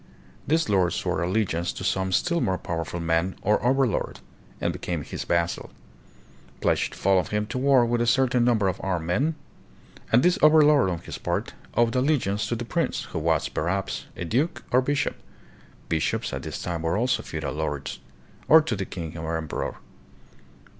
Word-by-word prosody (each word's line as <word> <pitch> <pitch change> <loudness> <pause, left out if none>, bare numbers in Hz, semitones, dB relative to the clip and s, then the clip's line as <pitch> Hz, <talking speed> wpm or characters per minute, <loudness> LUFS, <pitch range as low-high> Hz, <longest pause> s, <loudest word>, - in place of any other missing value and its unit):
This 160 +2 +2
lord 95 -3 +2
swore 80 - -1
allegiance 90 -2 0
to - - -7
some 95 0 0
still 170 - +1
more 95 -1 +1
powerful 85 -1 -4
man, 85 +2 0
or 105 +2 +2
"overlord," 130 -2 +1 0.4
and - - 0
became 85 -4 -3
his - - -6
"vas 85 0 +2
sal," - - -8 0.9
pledged - - +1
to - - -11
follow 95 -1 +3
him 105 +4 -2
to 125 - -4
war 135 -2 +5
with 120 0 0
a 120 - +1
certain 125 0 +3
number 115 -5 +3
of 95 - -2
armed 90 -4 -1
men; 140 - +1 0.8
and 120 +3 +5
this 180 0 +3
overlord, 150 -6 +6
on 85 -2 -3
his - - -7
part, - - -2 0.2
owed 120 -1 +3
allegi 130 -5 +2
ance 105 +1 -1
to 120 - -1
the 120 +1 -4
prince, 115 - -1
who - - -2
was, - - +1
perhaps, 95 +5 -2
a 90 - -4
duke 130 - 0
or 125 - +5
bishop 145 +2 -1 0.7
(bishops 80 -2 -1
at - - -3
this - - -5
time 85 -2 -3
were 80 +3 0
also 125 +3 +1
feudal - - -4
lords), - - -3 0.5
or 160 - +9
to 150 -8 -1
the 95 -1 -3
king 85 -4 -6
or 80 0 -2
emperor. 80 -2 -4
105 Hz, 180 wpm, -25 LUFS, 85-130 Hz, 0.9 s, or